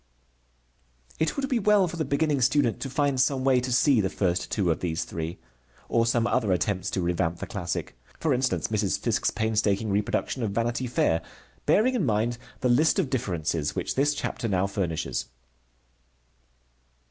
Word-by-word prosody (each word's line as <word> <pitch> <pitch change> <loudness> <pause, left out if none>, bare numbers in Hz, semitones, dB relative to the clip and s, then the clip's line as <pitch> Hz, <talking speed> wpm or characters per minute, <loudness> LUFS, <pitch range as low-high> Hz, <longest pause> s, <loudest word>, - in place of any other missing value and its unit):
It 160 - 0
would 275 -1 -1
be 255 -3 +1
well 205 -2 +4
for 175 - -6
the 160 - 0
beginning 140 0 +1
student 130 -2 +2
to 135 - -4
find 140 -1 +1
some 130 +1 +1
way 130 -1 +4
to 125 +1 -3
see 125 -1 +4
the 95 - 0
first 90 -2 -1
two 95 -5 +1
of 80 - -1
these 85 -1 -2
three, 85 +1 -5 0.5
or 115 0 +2
some 115 0 +2
other 120 -4 +1
attempts 95 0 0
to 95 - -2
revamp 85 -1 0
the - - -5
classic, 95 -4 -4 0.2
for 155 -4 +1
instance 130 0 0
Mrs. 105 -3 0
Fiske's - - 0
painstaking 110 -1 0
reproduction 105 +5 -1
of 110 - 0
Vanity 115 +4 -1
Fair, 85 -8 +1 0.5
bearing 245 +5 +4
in 240 -7 0
mind 115 -1 0 0.2
the 130 - +2
list 150 +10 +4
of 175 -9 0
differences 85 - -1
which - - -2
this 145 +2 +2
chapter 120 - -3
now 95 -2 +1
furnishes. 95 -5 -2
115 Hz, 170 wpm, -26 LUFS, 95-135 Hz, 0.5 s, well